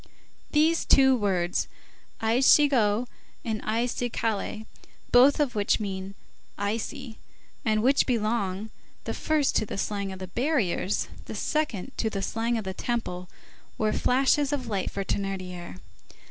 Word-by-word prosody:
These 315 +2 +3
two 265 -1 +6
words, 185 -6 0 0.6
icigo 245 -1 +4 0.4
and 220 -2 -2
icicaille, 225 -2 -2 0.5
both 265 +5 +6
of 285 -4 +1
which 205 +1 +1
mean 195 -1 -5 0.4
ici, 225 +4 -3 0.4
and 215 -1 +1
which 270 +3 +4
belong, 215 -4 -1 0.3
the - - -3
first 305 -3 +1
to - - +1
the - - -5
slang 200 -1 -2
of 190 - -7
the 185 - -6
barriers, 220 - 0 0.2
the - - -7
second 270 -7 -1
to 220 - 0
the 195 -2 -4
slang 230 +3 -1
of 220 - -3
the 190 -1 -4
Temple, 185 -6 -3 0.5
were 215 -1 +1
flashes 275 +3 +2
of 280 -3 -2
light 200 -5 -2
for 200 - -3
Thénardier. 185 -3 -4
220 Hz, 130 wpm, -27 LUFS, 195-255 Hz, 0.6 s, two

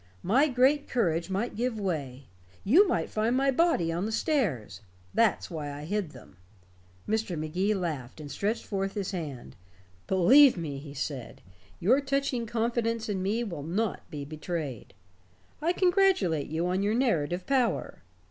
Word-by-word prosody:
My 260 +11 +4
great 270 +2 +2
courage 170 -8 0
might 205 +5 -2
give 235 0 -1
way 140 -9 -3 0.4
you 340 - +6
might 360 - 0
find 225 +4 0
my 275 +1 +3
body 265 - +2
on 175 +5 -2
the - - -3
stairs. 220 - -1 0.3
That's 225 -4 +2
why 150 -3 -4
I 145 +1 -7
hid 200 0 -2
them." 95 - -15 0.7
Mr. 215 -5 -1
Magee 180 +7 0
laughed, 155 -9 -4
and 145 -2 -8
stretched 210 +9 -2
forth 195 -1 -3
his 200 -2 -2
hand. 150 -9 -6 0.5
"Believe 245 +8 +6
me," 150 -5 -4
he 140 0 -10
said, 135 -3 -5 0.4
"your 250 +11 +3
touching 275 -4 -1
confidence 230 0 -1
in 195 -2 -1
me 210 +5 0
will 175 -10 -5
not 190 +8 -2
be 145 -4 -6
betrayed. 155 - -5 0.7
I 330 +3 +2
congratulate 360 - +2
you 160 +3 -2
on 185 +2 0
your 205 +2 +1
narrative 180 - 0
power. 260 -4 0
195 Hz, 155 wpm, -28 LUFS, 160-240 Hz, 0.7 s, you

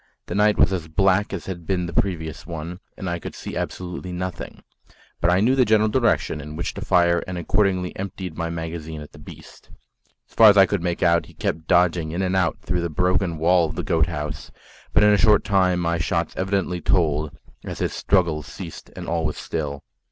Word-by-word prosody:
The - - -6
night 105 +1 +3
was 95 - +4
as 85 -3 -3
black 95 +5 +2
as 100 -3 -5
had 85 -4 -7
been 90 -2 0
the 85 - -6
previous 80 -6 -2
one, 85 +2 -6 0.2
and 95 - -5
I 85 0 -2
could - - -8
see - - -7
absolutely 90 0 -5
nothing; 90 0 -6 0.6
but 85 - +2
I 90 +2 +3
knew 125 +5 +3
the 130 - +5
general 110 -1 +3
direction 115 -9 +1
in 75 +1 -8
which 85 - -3
to - - -7
fire 85 -1 +3
and 90 -1 -4
accordingly 95 0 0
emptied 95 -3 -6
my 85 -1 -3
magazine 80 -1 -5
at 75 - -11
the 75 - -15
beast. 75 - -14 0.6
As - - -26
far 110 -1 +8
as 100 - +5
I 95 - +8
could 100 -2 -2
make 85 -1 -2
out, 85 0 +3
he - - -17
kept 80 0 -3
dodging 85 -2 +3
in 85 +4 -2
and 95 0 0
out 95 -3 +1
through 90 -1 -1
the 85 - -2
broken 90 +1 0
wall 85 +2 +3
of 80 - -7
the - - -3
goat 85 -5 +2
house; 75 -3 -5 0.4
but - - +4
in 105 0 +6
a - - +4
short 105 +2 +5
time 95 -3 +2
my 85 -1 0
shots 85 +1 -1
evidently 95 -2 -1
told, 75 -4 +1 0.3
as - - -6
his - - -2
struggles 85 -6 +1
ceased - - -9
and - - -7
all 85 0 -1
was 75 -1 -2
still. 70 -3 -4
90 Hz, 220 wpm, -23 LUFS, 80-95 Hz, 0.6 s, far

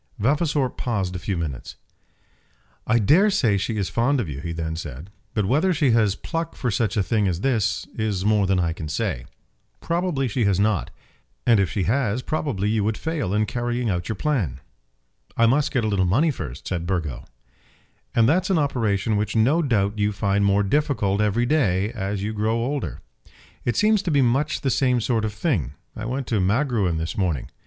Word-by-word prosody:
Vavasor 145 +3 +1
paused 100 -8 -3
a - - -3
few 95 0 -3
minutes. 75 -7 -5 1.1
"I 120 - +4
dare 155 - +4
say 120 - +2
she 105 +3 -2
is 100 -3 -1
fond 130 +4 +1
of 110 - -2
you," 70 -2 -5
he 85 - -4
then 80 -1 -3
said; 80 +3 -7 0.2
"but 105 -3 +1
whether 155 - +2
she 145 -4 +3
has 110 -4 +3
pluck 165 -1 -4
for 125 - -2
such 105 +1 0
a 100 - +3
thing 105 0 +1
as 90 -1 -1
this, 110 -5 0
is 105 -4 -2
more 105 -2 +3
than 95 -1 +2
I 85 -2 0
can 80 -2 -6
say. 65 -4 -2 0.5
Probably 170 -6 -1
she 120 +1 -1
has 100 -2 +2
not. 105 -4 +1 0.6
And 115 -3 +5
if 95 -3 +2
she 95 +2 -1
has, 120 +2 0
probably 135 -11 -2
you 105 -1 +1
would 105 +1 0
fail 160 - -2
in 105 +1 +2
carrying 120 0 -2
out 90 +1 -3
your 110 - -1
plan." 95 - -1 0.8
"I 115 - +5
must 135 +5 +3
get 125 -5 0
a - - +1
little 100 -3 +1
money 140 - +3
first," 75 - -7
said 85 -2 -3
Burgo. 80 -8 -2 0.9
"And 115 -1 +5
that's 185 +8 +2
an 190 - +3
operation 110 -7 0
which 105 +1 -2
no 130 +10 +3
doubt 105 -7 0
you 105 0 +2
find 100 0 0
more 100 0 +3
difficult 105 -4 +1
every 105 +3 +1
day, 110 -8 +1
as 100 -1 -3
you 110 +2 -2
grow 110 +1 0
older." 135 +4 -3 0.6
"It 120 - 0
seems 215 - +3
to 185 - -3
be 140 -4 +3
much 135 +5 +1
the 135 - 0
same 125 -2 +2
sort 115 -1 0
of 105 - -3
thing. 95 - -1 0.2
I 110 - -5
went 130 +3 -3
to 110 - +1
Magruin 105 - +1
this 80 +1 -3
morning." 85 -9 -1
110 Hz, 200 wpm, -23 LUFS, 95-130 Hz, 1.1 s, And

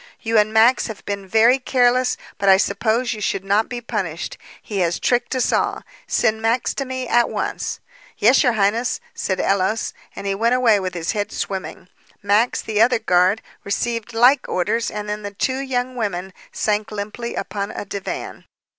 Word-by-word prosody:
You 225 -1 +2
and 210 +1 +2
Max 225 +3 +4
have 220 -3 -9
been 200 -1 -4
very 230 +6 +4
careless, 250 -1 +2 0.2
but 200 - +3
I 190 - +8
suppose 220 +5 0
you 215 - -8
should 195 -1 -1
not 205 +3 +2
be 245 -1 -5
punished. 195 -8 -4 0.2
He 205 -2 -5
has 175 -2 +1
tricked 245 +1 0
us 255 - +1
all. - - 0 0.2
Send 220 -1 +1
Max 230 +2 +1
to 275 - -3
me 260 -1 -4
at 240 0 +3
once." - - -3 0.4
"Yes, 240 +6 +5
your 245 - +3
highness," 220 +4 +1
said 190 -1 -2
Ellos, 195 +3 0 0.2
and - - -7
he 195 - 0
went 230 +5 +2
away 230 -5 +4
with 185 -2 -4
his 170 -1 -1
head 205 -1 -2
swimming. 190 -2 -5 0.4
Max, 210 +4 +2
the 215 -1 0
other 245 +2 +5
guard, 185 -1 +2 0.2
received 230 +2 -2
like 245 +4 +4
orders 230 +6 0
and 210 0 -5
then 210 0 -3
the 205 -1 -7
two 260 +5 -1
young 255 -2 -2
women 190 -5 -3 0.2
sank 210 0 -1
limply 210 +3 -5
upon 200 -1 -3
a 205 - -6
divan. 195 0 -6
220 Hz, 180 wpm, -21 LUFS, 200-240 Hz, 0.4 s, I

